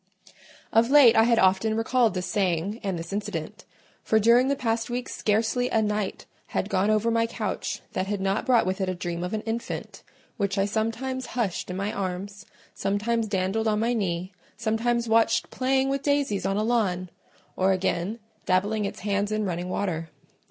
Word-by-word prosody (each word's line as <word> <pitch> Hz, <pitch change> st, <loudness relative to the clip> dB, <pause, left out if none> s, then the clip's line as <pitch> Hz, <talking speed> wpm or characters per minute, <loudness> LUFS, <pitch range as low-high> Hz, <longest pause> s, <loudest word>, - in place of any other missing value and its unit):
Of 230 Hz, +2 st, +4 dB
late 270 Hz, -5 st, +7 dB
I 225 Hz, 0 st, +6 dB
had 235 Hz, -1 st, +3 dB
often 195 Hz, +2 st, +3 dB
recalled 225 Hz, -2 st, +2 dB
this 180 Hz, 0 st, -2 dB
saying 190 Hz, +1 st, -1 dB
and 195 Hz, -3 st, -2 dB
this 165 Hz, +3 st, -6 dB
incident; 205 Hz, +1 st, -4 dB, 0.4 s
for 220 Hz, -, +2 dB
during 235 Hz, +4 st, +5 dB
the 280 Hz, -, +2 dB
past 230 Hz, -3 st, -1 dB
week 245 Hz, +1 st, -3 dB
scarcely 225 Hz, +4 st, 0 dB
a 225 Hz, -, +2 dB
night 210 Hz, -2 st, -2 dB, 0.2 s
had 195 Hz, -, -2 dB
gone 195 Hz, +2 st, +2 dB
over 215 Hz, +2 st, +2 dB
my 230 Hz, 0 st, +2 dB
couch -, -, -3 dB
that 185 Hz, +1 st, -1 dB
had 205 Hz, 0 st, -2 dB
not 195 Hz, +5 st, -1 dB
brought 240 Hz, -3 st, +4 dB
with 190 Hz, +2 st, -2 dB
it 190 Hz, -, 0 dB
a 185 Hz, -, -2 dB
dream 175 Hz, -1 st, -4 dB
of 180 Hz, +4 st, -2 dB
an 215 Hz, -, -2 dB
infant, 225 Hz, +1 st, -5 dB, 0.4 s
which 200 Hz, -2 st, -1 dB
I 195 Hz, -, +3 dB
sometimes 230 Hz, +5 st, -2 dB
hushed 200 Hz, -8 st, -1 dB
in 180 Hz, -, -4 dB
my 200 Hz, +2 st, -2 dB
arms, 200 Hz, +2 st, -5 dB, 0.3 s
sometimes 215 Hz, +3 st, -1 dB
dandled 200 Hz, +2 st, 0 dB
on 210 Hz, -1 st, +2 dB
my 235 Hz, +2 st, +1 dB
knee, 185 Hz, -4 st, -2 dB, 0.2 s
sometimes 235 Hz, +1 st, 0 dB
watched 225 Hz, 0 st, +2 dB
playing 265 Hz, +1 st, +1 dB
with 275 Hz, 0 st, -1 dB
daisies 280 Hz, -10 st, 0 dB
on 195 Hz, +1 st, 0 dB
a 210 Hz, -, +1 dB
lawn, 190 Hz, -6 st, 0 dB, 0.4 s
or 190 Hz, +1 st, +2 dB
again, 190 Hz, +2 st, -1 dB, 0.3 s
dabbling 205 Hz, +3 st, +1 dB
its -, -, -5 dB
hands 200 Hz, +1 st, 0 dB
in 215 Hz, 0 st, 0 dB
running 180 Hz, -1 st, -3 dB
water. 165 Hz, -4 st, -2 dB
210 Hz, 185 wpm, -26 LUFS, 190-230 Hz, 0.4 s, late